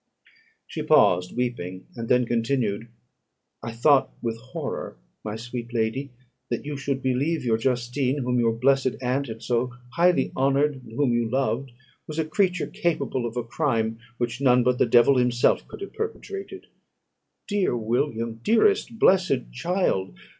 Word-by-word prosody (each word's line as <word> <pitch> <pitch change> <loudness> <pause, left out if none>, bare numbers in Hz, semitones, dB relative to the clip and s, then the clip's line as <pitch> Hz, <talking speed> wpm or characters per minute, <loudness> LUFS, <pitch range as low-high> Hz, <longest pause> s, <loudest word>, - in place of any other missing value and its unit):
She 160 - -5
paused, 120 - +3
weeping, 95 -7 -3
and 115 -1 -5
then 125 0 +4
continued 115 -2 -1 0.7
"I 115 - -5
thought 135 +4 +3
with 115 -1 -2
horror, 130 +2 -6 0.3
my 105 0 -4
sweet 120 +1 -6
lady, 115 +5 -1 0.4
that 120 +3 -3
you 150 0 -4
should 135 -1 -3
believe 135 +3 0
your 110 -2 +2
Justine, 125 +2 0
whom 125 0 +1
your 115 -1 +3
blessed 130 +2 +2
aunt 130 +2 -1
had 110 0 -8
so 125 0 0 0.2
highly 175 +4 +3
honoured, 140 +1 +1
and 110 -2 -13
whom 125 0 +1
you 120 -1 +1
loved, 130 +1 -1 0.4
was 155 - -6
a 160 - +1
creature 180 +1 +1
capable 135 -7 -1
of 115 +1 -7
a 120 - 0
crime 115 -3 -1 0.2
which 120 +2 -3
none 125 -2 +5
but 125 0 +1
the - - +4
devil 120 +3 +5
himself 125 -1 +2
could - - -11
have 395 - -7
perpetrated. 425 -3 -6 0.8
Dear 200 - +1
William! 115 0 -1
dearest 235 - +3
blessed 185 - +3
child! 125 - -1
125 Hz, 155 wpm, -25 LUFS, 115-145 Hz, 0.8 s, none